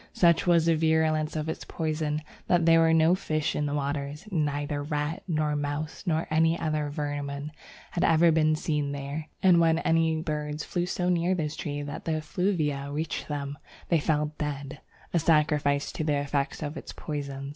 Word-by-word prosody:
Such 170 0 +4
was 170 -2 +5
the 165 -1 +4
virulence 160 -1 +2
of 155 0 -2
its 160 - -4
poison 155 -1 -2 0.2
that 175 -2 +3
there 165 0 +6
were 165 0 +5
no 160 +1 +5
fish 155 -4 -1
in 150 - 0
the 145 - -2
waters. 145 +4 -3
Neither 145 -3 -1
rat, 150 +4 -2
nor 155 -3 0
mouse, 145 +3 -3
nor 160 -1 +1
any 165 +2 +3
other 155 -2 -1
vermin 145 0 -4 0.4
had 175 - -1
ever 165 +1 +5
been 155 -1 +3
seen 150 -2 -1
there; 140 +2 -5 0.2
and 180 -3 +6
when 165 -1 +4
any 165 -1 +2
birds 150 -1 -3
flew 175 -1 -2
so 180 0 -1
near 180 +1 +2
this 155 -3 -2
tree 145 -2 -4
that 145 +2 -7
the 160 - 0
effluvia 155 -4 -1
reached 155 +2 -3
them, 145 -1 -4 0.3
they 170 - +4
fell 150 0 0
dead 140 -1 -4 0.3
a 170 - +4
sacrifice 150 -3 +2
to - - -3
the 150 -2 +1
effects 140 +2 -1
of 150 +2 -4
its - - -8
poison. 140 -2 -5
155 Hz, 180 wpm, -27 LUFS, 145-165 Hz, 0.4 s, there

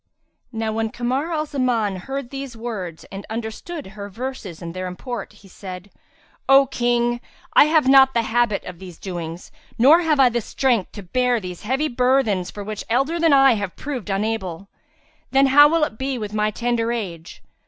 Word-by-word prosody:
'" - - -51
Now 225 -2 -2
when 225 0 -1
Kamar 255 +8 -2
al 310 -2 -1
Zaman, 245 -8 0
heard 270 +6 -6
these 275 -3 -6
words 200 -8 -6
and 195 +1 -7
understood 230 +9 -5
her 200 0 -7
verses 225 -5 -6
and 170 -1 -7
their 185 0 -4
import, 220 +4 -6
he 200 - -18
said, 185 0 -9 0.6
"O 270 0 +7
King, 240 -1 0 0.3
I - - +7
have 310 -3 +3
not 265 -1 +6
the 235 - +2
habit 230 -2 +1
of 180 -2 -9
these 180 -3 -10
doings, 175 -2 -7 0.3
nor 290 +9 +6
have 310 -4 +1
I 255 -2 +6
strength 235 -2 0
to 205 - -8
bear 245 +6 +1
these 180 -3 -8
heavy 265 +7 0
burthens 250 -7 +1
for 205 - -7
which 210 0 -5
elder 275 +8 +1
than 330 -1 +4
I 270 -1 +6
have 200 -4 -4
proved 260 -8 -5
unable; 195 -3 -2 0.6
then 270 +1 +4
how 290 +2 +7
will 330 0 +2
it 220 -7 -2
be 265 -1 -2
with 210 -2 -5
my 215 0 +1
tender 235 +1 -1
age?" 180 -8 -6
235 Hz, 185 wpm, -22 LUFS, 200-270 Hz, 0.6 s, O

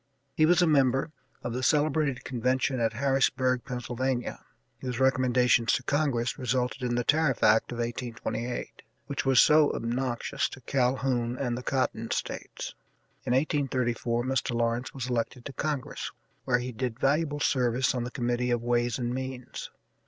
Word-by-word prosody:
He 155 - +4
was 175 +1 +5
a - - +5
member 135 -1 +3 0.3
of 120 - -3
the 125 - -2
celebrated 145 -2 +2
convention 130 +1 0
at 115 -1 +1
Harrisburg, 130 0 +1
Pennsylvania, 125 -1 -3 0.4
whose 125 -2 -4
recommendations 125 -3 +3
to - - 0
Congress 140 -5 0
resulted 125 +1 -1
in 120 -1 0
the 120 - +1
tariff 150 -1 +2
act 110 +3 +4
of 120 - -5
1828, 120 0 -4 0.2
which 140 -1 -3
was 135 -1 +5
so 150 -1 +6
obnoxious 125 +3 -1
to 130 - -11
Calhoun 125 -2 0
and 125 -3 -1
the 125 - -4
Cotton 125 -3 -1
States. - - -4 0.5
In 125 - +2
1834 125 -4 0
Mr. 130 -1 -1
Lawrence 115 +2 0
was 130 -3 -5
elected 120 0 -2
to 140 - -6
Congress, 145 -3 -3 0.3
where 125 - +3
he 125 +1 -4
did 125 0 -4
valuable 145 +2 +1
service 125 -2 +2
on 125 -2 -2
the 120 - -4
Committee 120 -1 -1
of 120 -1 0
Ways 120 -1 +1
and 120 -1 -2
Means. 130 -1 -5
125 Hz, 155 wpm, -28 LUFS, 120-135 Hz, 0.5 s, so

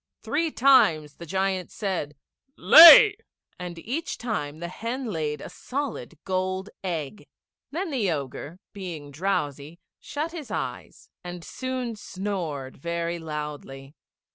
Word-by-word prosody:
Three 325 +3 0
times 165 - +4
the 170 - -10
giant 190 +1 -1
said 180 -8 -4 0.4
"Lay," 340 +6 +10 0.4
and 175 -1 -6
each 260 - -4
time 155 -11 -4
the 170 +1 -5
hen 235 +8 -5
laid 150 -4 -3
a - - -7
solid 250 - -5
gold 185 +1 -2
egg. 170 +1 -5 0.4
Then 340 +3 -4
the 230 -9 0
Ogre, 145 +1 -5 0.2
being 170 -7 -7
drowsy, 150 -2 -3 0.2
shut 305 +3 -4
his 320 -6 -8
eyes, - - -6
and 175 -1 -8
soon 255 +3 -4
snored 180 -10 -5
very 170 +2 -3
loudly. 150 -3 -7
180 Hz, 120 wpm, -25 LUFS, 150-235 Hz, 0.4 s, Lay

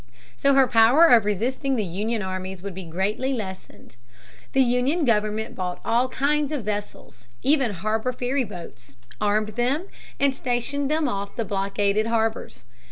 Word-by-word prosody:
So 280 0 +3
her 270 -1 +6
power 245 +7 +6
of 235 -9 +6
resisting 250 +7 -1
the 220 - 0
Union 210 +5 -2
armies 185 0 -5
would 200 -1 -5
be 185 0 -7
greatly 200 +10 -1
lessened. 190 - -8 0.6
The 265 - +5
Union 255 +7 +1
government 215 -1 0
bought 180 -1 -4
all 245 +3 +2
kinds 295 +2 0
of 290 -6 -2
vessels, 205 - -6 0.2
even 275 -3 +3
harbor 215 +5 -1
ferryboats, 210 - -4 0.3
armed 210 +1 +1
them, 250 - -1 0.3
and 280 -1 +3
stationed 265 +2 -2
them 310 0 +1
off 200 -4 -4
the 230 - -2
blockaded 200 +2 0
harbors. 225 - -2
225 Hz, 150 wpm, -24 LUFS, 200-260 Hz, 0.6 s, her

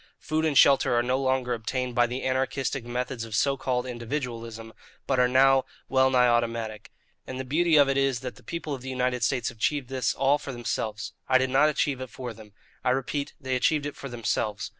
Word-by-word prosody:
Food 155 +1 -1
and 150 -4 +1
shelter 135 -3 +5
are 120 - +3
no 130 +2 0
longer 130 -2 0
obtained 125 +2 -3
by 120 0 +3
the 125 +2 -4
anarchistic 130 0 -1
methods 125 0 -3
of 115 -1 -5
so 140 +4 +2
called 130 -2 -1
individualism 115 -3 -5 0.3
but 130 -2 +1
are 125 - +5
now 135 +1 +5 0.3
wellnigh 130 -2 +4
automatic. 115 -2 -1 0.4
And 130 0 -5
the 130 - -4
beauty 160 +5 +2
of 145 -2 +6
it 135 0 +1
is 135 -3 +1
that 125 -2 -6
the 125 - -16
people 155 +4 -5
of 135 - -5
the 130 - -7
United 125 -1 -1
States 120 +2 +1
have 110 - -13
achieved 140 0 -1 0.2
all 140 +2 +3
this - - -13
for 135 - -5
themselves. 115 -2 -3 0.2
I 130 - +6
did 130 0 0
not 145 +3 +5
achieve 140 -3 -1
it 130 - -6
for 125 -2 -7
them. 105 -2 -15 0.3
I 125 - +2
repeat, 135 +2 -2
they 130 -3 -2
achieved 145 +3 +1
it 145 - -5
for 140 - -8
themselves. 115 -3 -2
130 Hz, 215 wpm, -26 LUFS, 120-135 Hz, 0.4 s, of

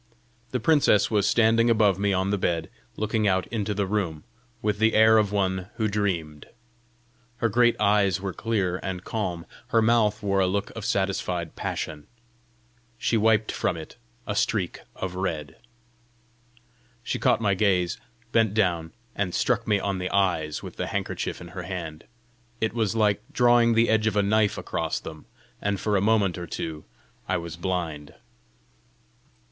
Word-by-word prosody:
The 125 - -1
princess 140 -6 +3
was 105 -2 +2
standing 115 0 +4
above 105 -4 +3
me 100 0 +1
on 95 +1 0
the 105 - +1
bed, 85 -3 -1 0.3
looking 110 0 0
out 95 -1 +2
into 105 -2 -2
the 100 0 0
room, 95 -6 -2 0.4
with 105 -1 -1
the 110 0 +3
air 110 0 +6
of 105 -2 +1
one 95 -2 0
who 110 -2 0
dreamed. 90 -8 -2 0.9
Her 115 - +1
great 120 +2 +3
eyes 100 -3 +3
were 95 -1 -4
clear 100 -3 -1
and 90 -2 -4
calm. 90 -7 -3 0.2
Her 115 -2 +3
mouth 110 -2 +2
wore 100 -1 +1
a 95 - +3
look 100 +2 -1
of 110 -2 -6
satisfied 95 -6 -1
passion; 75 -1 -4 0.9
she - - 0
wiped 110 0 +3
from 85 - -1
it 80 +7 -10 0.3
a 100 - -3
streak 95 -3 0 0.2
of 95 -1 -4
red. 80 -6 -4 1.5
She - - -3
caught - - +3
my 105 -3 +2
gaze, 90 -3 +1 0.3
bent 110 -3 +2
down, 85 -6 +1 0.2
and 95 -3 -2
struck 115 -2 +1
me 105 -2 +3
on 95 -1 -2
the 90 0 -2
eyes 85 -6 0
with - - -9
the - - -2
handkerchief - - -3
in 85 - -10
her 90 +1 -6
hand: 85 -3 -6 0.5
it 110 - 0
was 115 -2 0
like 105 -2 +2
drawing 120 -1 +4
the 115 +1 +4
edge 110 0 +2
of 110 - 0
a 105 - +3
knife 105 +1 +2
across - - -2
them, 80 -1 -10 0.3
and 100 -1 -1
for 105 +2 0
a 95 - +2
moment 100 -4 +2
or 85 - -6
two 80 -1 -5 0.4
I 90 - +2
was 85 -1 -6
blind. 85 -4 -4
100 Hz, 165 wpm, -25 LUFS, 90-110 Hz, 1.5 s, air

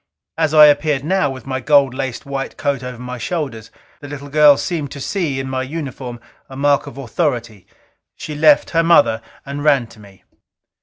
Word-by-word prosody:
As 160 -1 0
I 150 -1 +10
appeared 145 -1 +2
now, 170 -2 +1
with 130 -1 -8
my 130 -1 -3
gold 140 0 +3
laced 130 +1 -5
white 140 -1 -5
coat 140 -3 -1
over 125 -1 -7
my 125 0 -7
shoulders, 130 -7 -4 0.3
the 145 - -10
little 145 0 -8
girl 150 -1 +6
seemed 155 -5 -3
to 140 - -8
see 150 -3 -2
in 135 - -4
my 130 0 -2
uniform 130 -4 -6 0.3
a 135 - -10
mark 145 +1 +2
of 140 - -10
authority. 120 - -3 0.5
She 155 - -7
left 150 -1 +4
her 165 - +3
mother 150 -9 +4 0.2
and 140 +1 -5
ran 140 -5 +3
to 110 - -17
me. 100 -2 -17
140 Hz, 190 wpm, -18 LUFS, 130-150 Hz, 0.5 s, I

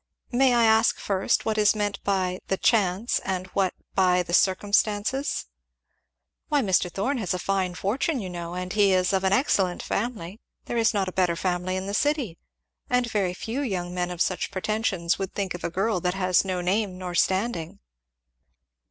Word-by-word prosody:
"May 255 0 +4
I 235 - +4
ask, 220 0 +4
first, 195 -1 0
what 220 -1 0
is 210 +1 +4
meant 205 -2 -2
by 185 -2 0
the 190 - 0
'chance' 205 0 +2
and 185 -1 -3
what 190 -2 +1 0.2
by 180 -1 +3
the 175 - -7
'circumstances.'" 205 +7 +1 1.0
"Why 290 -3 +2
Mr. 185 -3 +1
Thorn 250 +9 -1
has 185 -4 -1
a - - -1
fine 185 -1 -1
fortune, 260 - -1
you 195 - -5
know, 175 -1 -6
and 180 0 -4
he 205 -2 +4
is 185 +1 +2
of 190 0 +1
an 190 - +2
excellent 195 -6 +1
family 210 -3 -3 0.3
there - - -4
is 225 -1 +3
not 195 -2 +1
a - - -3
better 180 -2 +1
family 180 +1 -1
in 185 0 -3
the 200 - -4
city 270 - 0 0.5
and 250 -2 +1
very 190 -4 0
few 230 +8 -4
young 180 -9 -3
men 180 0 -1
of 180 -1 0
such 185 - -2
pretensions 190 -3 -1
would 195 -1 -4
think 195 -2 -2
of 175 - -8
a - - -1
girl 195 +3 0
that 180 +1 -1
has 185 -2 +2
no 185 -2 -2
name 190 +1 0
nor 180 -1 -5
standing." 185 -2 0
190 Hz, 185 wpm, -25 LUFS, 180-215 Hz, 1.0 s, May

